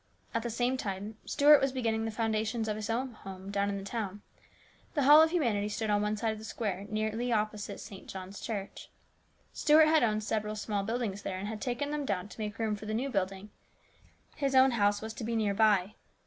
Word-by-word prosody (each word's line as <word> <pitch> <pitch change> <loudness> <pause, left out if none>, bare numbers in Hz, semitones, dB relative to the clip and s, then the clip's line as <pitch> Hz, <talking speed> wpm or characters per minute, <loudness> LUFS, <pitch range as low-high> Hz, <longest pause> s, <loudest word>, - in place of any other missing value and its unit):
At 230 - 0
the 235 - -3
same 245 +3 0
time 205 -1 -5
Stuart 295 0 +6
was 270 0 +2
beginning 225 -4 -1
the 225 - -2
founda 220 -1 0
tions 220 0 -2
of 215 - -1
his 215 0 -5
own 250 +3 -1
home 195 -3 -9
down 200 0 0
in 200 - -2
the 195 - -6
town. 205 -1 -4 0.7
The 290 - +2
Hall 295 +3 +9
of 320 - +5
Humanity 230 - 0
stood 215 0 -2
on 205 0 +3
one 210 +1 0
side 225 +1 0
of 215 - -8
the - - -10
square 205 -3 -3
nearly 220 +3 -1
opposite 215 -2 -1
St. 200 -3 -10
John's 190 +1 -7
Church. 200 -3 -5 0.6
Stuart 310 +1 +6
had 315 0 +5
owned 215 -2 +1
several 215 -1 -2
small 210 -1 -2
buildings 215 -1 -2
there 185 - -4
and 195 +2 -4
had 215 0 -5
taken 265 +3 -2
them 300 -1 -2
down 200 -6 -2
to - - -13
make 210 -1 -4
room 220 -2 0
for 210 +1 -9
the 215 - -1
new 265 +4 -1
building. 195 0 -2 0.9
His 275 -2 0
own 260 0 +7
house 205 -2 +2
was 220 0 -5
to 225 - -7
be 230 +1 -2
near 215 -3 +1
by. 205 -2 +3
215 Hz, 225 wpm, -31 LUFS, 205-240 Hz, 0.9 s, Hall